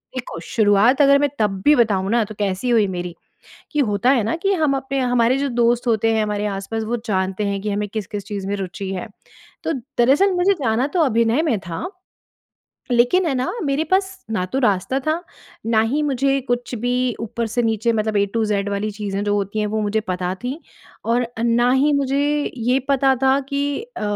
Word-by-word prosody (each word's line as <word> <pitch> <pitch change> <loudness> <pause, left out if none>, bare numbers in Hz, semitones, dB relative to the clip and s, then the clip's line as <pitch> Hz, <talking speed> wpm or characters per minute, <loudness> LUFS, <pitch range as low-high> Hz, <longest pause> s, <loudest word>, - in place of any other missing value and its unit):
देखो 250 - -5
शुरुआत 220 +5 +3
अगर 280 0 +6
मैं 290 0 +2
तब 195 -3 0
भी 300 - +7
बताऊँ 200 -6 +2
ना, 235 -1 +3
तो 215 - -10
कैसी 200 +4 -1
हुई 225 -4 +4
मेरी 175 -1 -5 0.6
कि 300 - +1
होता 205 +5 +2
है 260 -4 +3
ना 230 - -1
कि 395 0 +2
हम 305 -6 +1
अपने 270 +1 -3
हमारे 245 0 +2
जो 280 0 0
दोस्त 240 0 +1
होते 225 -1 +2
हैं 220 - +2
हमारे 210 0 -2
आस-पास 200 +3 -3
वो 240 +2 -1
जानते 190 0 -1
हैं 200 0 -2
कि 210 - -2
हमें 205 +1 -2
किस-किस 205 -1 -5
चीज़ 200 -2 -5
में 200 - -1
रुचि 190 0 -5
है। 185 - -4 0.6
तो - - 0 0.3
दरअसल 280 +11 +4
मुझे 360 +2 +3
जाना 230 +3 +1
तो 355 - +2
अभिनय 235 +2 +2
में 275 -11 +1
था, 175 - -5 1.0
लेकिन 245 +10 +3
है 280 - 0
ना 255 0 -1
मेरे 285 +3 0
पास 380 0 0
ना 185 -5 0
तो 265 - -3
रास्ता 210 +3 +1
था, 310 +5 -1 0.4
ना 225 -1 +3
ही 275 +7 0
मुझे 275 -1 +1
कुछ 245 0 -1
भी 245 +3 -1 0.3
ऊपर 230 +1 -3
से 240 +2 0
नीचे 225 +1 +1
मतलब 215 -1 -1
ए 200 - +4
टू 225 - +1
ज़ेड 200 -1 0
वाली 205 +2 -2
चीज़ें 205 -1 -4
जो 205 0 +1
होती 205 +1 -2
हैं 210 - 0
वो 215 +1 -1
मुझे 210 +1 0
पता 185 -3 -3
थी। 265 +6 -3 0.4
और 235 +1 +1 0.2
ना 240 +1 +3
ही 280 +3 +3
मुझे 280 0 +1 0.4
ये 245 +3 +1
पता 270 -1 +3
था 265 +1 +4
कि 285 +3 -1 0.2
अ - - -5
230 Hz, 205 wpm, -21 LUFS, 205-270 Hz, 1.0 s, भी